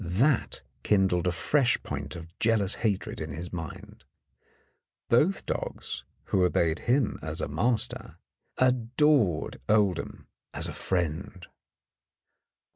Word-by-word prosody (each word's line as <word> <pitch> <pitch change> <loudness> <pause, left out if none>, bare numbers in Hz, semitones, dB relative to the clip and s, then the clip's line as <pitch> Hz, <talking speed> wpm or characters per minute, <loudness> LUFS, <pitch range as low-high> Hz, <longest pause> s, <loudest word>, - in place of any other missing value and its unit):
That 110 - +1 0.2
kindled 95 -4 +2
a - - +3
fresh 125 - +2
point 70 -1 -5
of 85 -1 -7
jealous 110 -4 +2
hatred 105 -4 -1
in 75 -2 -5
his 85 +4 -7
mind; 80 -4 -8 1.1
both 155 +11 +3
dogs, - - -4 0.2
who 95 - +1
obeyed 85 -2 +2
him 130 -2 +2
as 80 0 -4
a - - -1
master, 110 - 0 0.4
adored 125 - +2
Oldham 105 -5 +1 0.3
as - - +4
a - - -5
friend. 90 +1 -3
95 Hz, 115 wpm, -28 LUFS, 85-120 Hz, 1.1 s, as